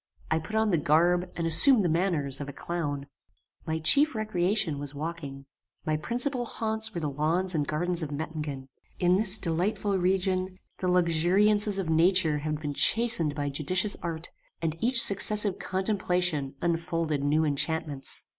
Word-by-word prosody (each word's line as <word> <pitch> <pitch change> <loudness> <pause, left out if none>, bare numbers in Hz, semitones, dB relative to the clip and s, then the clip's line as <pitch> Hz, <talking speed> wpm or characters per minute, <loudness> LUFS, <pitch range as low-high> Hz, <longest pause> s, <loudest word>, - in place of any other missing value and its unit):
I 160 - +2
put 165 +7 -8
on 220 -1 +1
the 170 - +2
garb 175 +4 +2
and 170 - -3
assumed 210 - +5
the - - +1
manners 160 -5 0
of 140 - -6
a - - -8
clown. 145 -4 -4 0.6
"My 160 0 -1
chief 280 - +3
recreation 190 -6 0
was 145 0 -7
walking. 145 -3 -7 0.4
My 155 - 0
principal 245 - -3
haunts 220 -1 -1
were - - -2
the 150 - -2
lawns 160 +6 0
and 150 -3 -1
gardens 175 +3 -1
of 155 - -4
Mettingen. 150 -3 -5 0.3
In 180 0 +2
this 205 0 -1
delightful 190 +3 -1
region 185 0 -1 0.2
the 185 - -2
luxuriances 180 +4 +2
of 180 -5 -2
nature 165 -2 +2
had 155 0 -4
been 150 -2 -4
chastened 200 - +2
by 145 -1 -2
judicious 185 +9 0
art, 165 -1 -5 0.3
and 160 -1 -2
each 245 +1 +4
successive 205 0 +3
contemplation 180 -7 -1
unfolded 165 -3 -1
new 155 +2 +1
enchantments. 150 -1 -2
170 Hz, 155 wpm, -27 LUFS, 155-195 Hz, 0.6 s, assumed